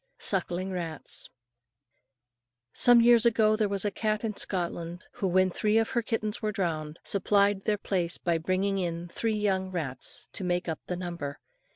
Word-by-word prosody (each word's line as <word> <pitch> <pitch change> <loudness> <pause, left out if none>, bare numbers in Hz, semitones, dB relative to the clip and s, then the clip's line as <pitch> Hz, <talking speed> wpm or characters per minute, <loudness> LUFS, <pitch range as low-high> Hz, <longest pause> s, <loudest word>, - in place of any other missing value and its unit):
SUCKLING 185 -1 0
RATS. 165 -5 +1 1.4
Some 245 -1 +6
years 235 -1 +6
ago 220 -2 +4
there 215 -2 0
was 200 0 -1
a 205 - +1
cat 215 +1 -1
in 215 -2 -2
Scotland 175 -2 -3
who, 195 - -2
when 185 +1 +3
three 215 +4 +1
of 225 0 +1
her 240 - +1
kittens 225 -1 -3
were 215 -1 -1
drowned, 160 -6 -3
supplied 200 0 +1
their 215 -1 +1
place 180 -4 -2
by 170 -2 0
bringing 190 +4 0
in 170 -1 -3
three 220 +4 -1
young 190 -2 0
rats 150 -8 -2
to - - +1
make 180 0 -1
up 160 -2 -3
the 180 - -3
number. 170 -6 -5
190 Hz, 170 wpm, -28 LUFS, 175-215 Hz, 1.4 s, Some